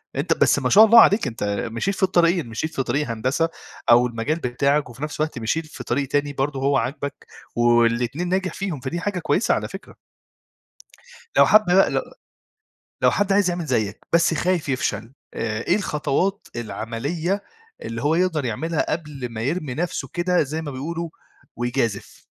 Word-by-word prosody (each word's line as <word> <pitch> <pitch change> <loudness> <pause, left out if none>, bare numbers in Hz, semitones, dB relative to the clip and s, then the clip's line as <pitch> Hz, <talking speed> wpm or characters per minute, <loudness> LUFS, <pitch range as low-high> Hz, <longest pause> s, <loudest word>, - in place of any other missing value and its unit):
أنت - - +1
بس - - +4
ما - - 0
شاء 215 +2 +8
الله 230 +1 +8
عليك 205 - +4
أنت 115 -3 -5 0.3
مشيت 195 - -1
في 190 - -3
الطريقين، 175 -4 +3
مشيت 160 +8 -4
في 135 - 0
طريق 145 +2 -1
هندسة 130 +9 0 0.4
أو 120 +1 +6
المجال 120 +8 -2
بتاعك 140 +2 0
وفي 125 +5 -9
نفس 150 -1 -5
الوقت 155 -5 -1
مشيت 155 +9 -1
في 145 -4 -9
طريق 135 +3 -1
تاني 145 +1 0
برضه 135 0 -2
هو 135 0 +2
عاجبك 140 +3 -4 0.3
والاتنين 120 +7 +2
ناجح 190 0 -1
فيهم، 190 -8 -4
فدي 140 +7 -4
حاجة 185 0 -2
كويسة 185 +5 +1
على - - -2
فكرة. - - -10 1.4
لو - - +8
حد 215 -1 +6
بقى 185 +2 +4
لو - - 0 1.0
لو - - +6
حد 205 -1 +1
عايز 195 -2 +3
يعمل 175 -2 -3
زيّك 110 -6 -1
بس 170 0 +4
خايف 175 -2 0
يفشل، 130 -2 -2 0.2
آآ، 110 0 -2
إيه 185 - +3
الخطوات 185 +2 -1
العملية 140 - -3 0.4
اللي 115 +1 -5
هو 150 +2 +2
يقدر 170 -4 +1
يعملها 155 +8 -2
قبل 150 -5 -4
ما 110 -1 -5
يرمي 145 0 -2
نفسه 175 +2 -3
كده 180 0 +1
زي 155 +3 -4
ما 145 - -5
بيقولوا 165 +5 -4 0.5
ويجازِف؟ 120 -4 -2
150 Hz, 170 wpm, -22 LUFS, 125-175 Hz, 1.4 s, شاء